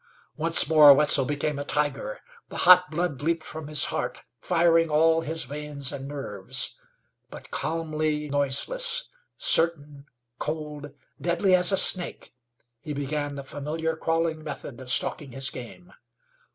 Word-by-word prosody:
Once 165 +1 +5
more 155 -2 +8
Wetzel 145 -2 +5
became 145 +1 -3
a - - -3
tiger. 150 - -2 0.3
The - - -8
hot 180 0 +7
blood 165 -3 -3
leaped 165 +1 -1
from 155 -1 -8
his 150 -1 +3
heart, - - -3 0.2
firing 165 0 +2
all 160 +2 +3
his 160 +1 -3
veins 145 +1 -4
and 135 -1 -7
nerves. 135 -10 -4 0.5
But - - -12
calmly 155 -2 -3
noiseless, 470 - 0 0.3
certain, 150 -4 +1 0.3
cold, 150 -1 -5 0.3
deadly 175 +2 +1
as 180 +1 +6
a 195 - +2
snake 180 -8 0 0.5
he 150 +4 -7
began 145 0 -4
the 140 - -7
familiar 155 +4 -4
crawling 165 -1 -2
method 140 -4 -8
of 130 - -9
stalking 135 0 -2
his 135 0 -2
game. 175 +9 -11
150 Hz, 140 wpm, -25 LUFS, 145-165 Hz, 0.5 s, more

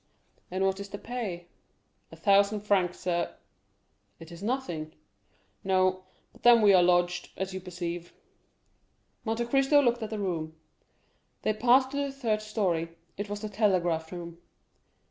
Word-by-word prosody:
"And 185 +1 0
what 190 0 0
is 200 0 -7
the 200 - -6
pay?" 205 -8 -5 0.7
"A - - -10
thousand 200 +1 +3
francs, 190 -4 +1
sir." 175 -2 -1 0.8
"It 165 +1 -12
is 170 +1 -10
nothing." 200 -10 -3 0.7
"No; 185 -1 +1 0.3
but - - -20
then 235 -2 +7
we 205 -1 +7
are 185 - +7
lodged, 175 0 +2
as 190 0 -3
you 190 - -5
perceive." 175 -1 -5 1.1
Monte 225 +1 -1
Cristo 270 +4 +4
looked 240 -3 +2
at 220 - -4
the 220 - -4
room. 165 -6 -3 0.9
They 215 - +2
passed 250 +4 +4
to 280 - -4
the 280 -1 -1
third 230 -6 -1
story; 175 -6 -1 0.2
it 205 +1 -5
was 205 0 -4
the 215 - -4
telegraph 180 -6 +1
room. 170 -1 -8
195 Hz, 150 wpm, -28 LUFS, 175-220 Hz, 1.1 s, then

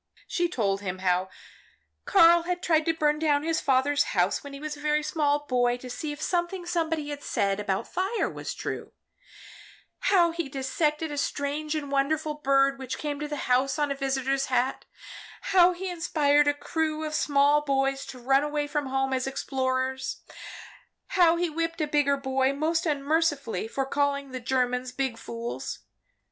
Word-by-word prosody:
She 345 -1 0
told 200 - 0
him 185 -2 -4
how 185 0 +1 0.8
Karl 340 -3 +6
had 355 +1 -3
tried 320 -2 +2
to 330 - +2
burn 300 -1 +1
down 295 -2 +2
his 325 0 0
father's 275 +2 +2 0.2
house, 180 +2 +2
when 285 -1 -8
a - - -8
very 300 0 -1
small 295 -2 0
boy, 245 -2 +1
to 250 0 -9
see 300 +4 -4
if 295 - -7
something 350 +2 -1
somebody 325 -3 -1
had 290 -1 -5
said 200 -5 0
about 195 -2 -2
fire 385 +5 -1
was - - -6
true, - - -5 1.2
how 345 -4 +5
he 330 -4 -4
dissected 295 +3 -1
a 290 - -3
strange 295 +2 -2
and 285 -2 -4
wonderful 300 +2 0
bird 275 -2 +2
which 260 -1 -5
came 290 -2 -4
to 300 - -3
the 295 -1 -4
house 260 +2 +2
on 295 -1 0
a - - -1
visitor's 270 0 -1
hat, 255 +1 0 0.7
how 360 -1 +7
he 365 +2 -5
inspired 295 -4 +2
a 290 - +4
whole 290 - -20
crew 315 -1 -1
of 310 0 -4
small 290 0 +3
boys 270 -1 0
to 255 - -8
run 270 +3 +3
away 295 0 -1
from 290 -1 -2
home 270 0 0
as 260 0 -1
explorers, 260 -1 -2 0.9
how 345 -3 +4
he 350 +1 0
whipped 330 +1 -3
a 305 - +1
bigger 290 -1 +2
boy 265 -1 +1
most 325 +4 0
unmercifully 285 - 0
for 270 +4 -2
calling 280 0 -1
the 255 - -4
Germans 250 0 0
big 260 -3 -2
fools. 230 +1 -5
285 Hz, 175 wpm, -27 LUFS, 265-310 Hz, 1.2 s, how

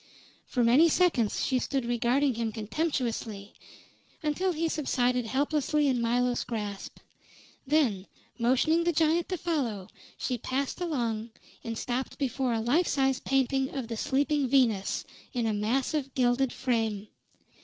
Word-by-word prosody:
For 245 - 0
many 265 +9 +6
seconds 305 - +2
she 260 -1 +1
stood 270 -1 -2
regarding 245 +4 +2
him 225 -1 -2
contemptuously, 225 -3 -3 0.7
until 335 +5 0
he 330 0 -1
subsided 250 -6 0
helplessly 290 +3 +1
in 255 -3 +1
Milo's 245 +1 +1
grasp; 210 -4 -5 0.7
then, 255 -11 +2 0.3
motioning 265 +8 +3
the 345 0 +1
giant 325 +2 +2
to 370 - -1
follow, 260 - -2 0.3
she 250 -2 -2
passed 270 +8 -2
along 235 -9 -2 0.3
and 230 -1 -4
stopped 250 +3 -3
before 265 -2 -1
a 225 -1 0
life 290 +10 +2
size 270 -2 +1
painting 270 0 +1
of 255 -4 -4
"The 230 - -3
Sleeping 285 +3 +1
Venus" 235 -7 +2 0.3
in 240 -2 -1
a 220 - +1
massive, 260 +6 -1
gilded 250 +1 +2
frame. 225 -5 -1
255 Hz, 135 wpm, -28 LUFS, 230-290 Hz, 0.7 s, many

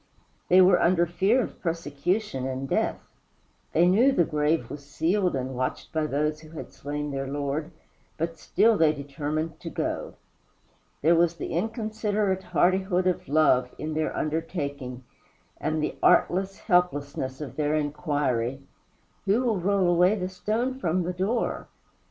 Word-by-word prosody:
They 185 +1 +7
were 180 -1 +5
under 170 0 +4
fear 195 +9 +2
of - - -8
persecution 165 -1 -2
and 135 +1 -4
death; - - 0 0.7
they 170 +2 +4
knew 230 +9 +5
the 180 - +3
grave 150 +1 0
was 145 -1 -8
sealed 170 +5 0
and 130 0 -3
watched 130 0 -3
by 155 -1 0
those 150 +2 -1
who 155 0 -14
had - - -8
slain 145 +2 -4
their 135 0 -3
Lord, 145 +3 -2 0.5
but 165 0 -3
still 215 +3 +3
they 155 -2 +5
determined 150 +2 -4
to - - -6
go. - - -3 0.9
There 165 +3 +5
was 170 0 +3
the - - -5
inconsiderate 215 0 -1
hardihood 185 +1 +1
of 185 -1 0
love 135 -4 +3
in 155 +1 -4
their 155 0 -1
undertaking, 145 -5 -3 0.6
and 155 0 -1
the - - -2
artless 190 +2 +3
helplessness 145 -7 0
of 145 -6 -7
their 150 0 0
inquiry, 145 -4 -1 0.6
"Who 210 +6 +2
will 225 -6 +1
roll 190 0 +2
away 180 +3 +4
the 185 -3 -3
stone 230 +7 -2
from 180 -4 0
the 180 +2 -2
door?" 200 +7 -1
165 Hz, 150 wpm, -26 LUFS, 145-185 Hz, 0.9 s, They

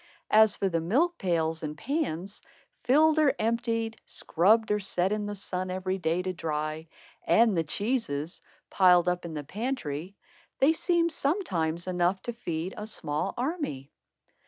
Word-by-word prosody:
As 215 -1 +6
for 195 - 0
the 165 -3 0
milk 300 - +1
pails 165 -4 0
and 150 -1 -5
pans, 200 - -3 0.4
filled 310 +5 +4
or 285 -3 +4
emptied, 230 0 -1
scrubbed 215 +6 +2
or 210 - +2
set 190 -1 0
in 210 -1 -1
the 205 - -4
sun 185 -2 -4
every 185 +1 -2
day 170 +1 0
to 185 0 -2
dry, 155 -1 -3 0.4
and 225 -3 +4
the 165 - +1
cheeses, 175 - -2 0.3
piled 180 -2 +5
up 180 0 0
in 165 -2 -6
the 150 - -4
pantry, 195 - -4 0.4
they 285 +4 +4
seemed 340 0 +1
sometimes 180 - -1
enough 180 +1 +1
to 240 - -4
feed 175 -5 -4
a 210 - -5
small 150 -8 -2
army. 250 - -3
190 Hz, 155 wpm, -28 LUFS, 165-235 Hz, 0.4 s, As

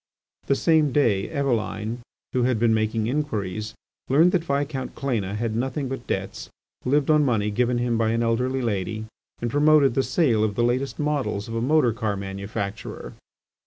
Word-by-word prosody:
The 140 - +3
same 155 -1 +3
day 115 -8 +2
Eveline, 120 -5 -1 0.3
who 130 - +1
had 125 -1 +2
been 115 0 +3
making 110 0 0
inquiries, 110 -6 -2 0.3
learned 160 +7 +5
that 175 -3 +1
Viscount 140 -2 -2
Cléna 110 -8 -2
had 110 0 -2
nothing 130 +3 -2
but 135 - -6
debts, - - -4 0.4
lived 145 +3 +2
on 150 -1 +5
money 110 -6 +1
given 120 +3 +1
him 120 -1 0
by 110 -1 +2
an 115 +1 +1
elderly 125 +3 0
lady, 110 0 -2 0.4
and 120 - -1
promoted 145 -2 +4
the 135 - +2
sale 130 -8 +2
of 105 -2 0
the 120 - +1
latest 125 +2 0
models 145 -9 -1
of 115 - -6
a 115 - -1
motor 130 -2 +3
car 105 -2 -2
manufacturer. 100 +1 -5
120 Hz, 170 wpm, -24 LUFS, 110-140 Hz, 0.4 s, learned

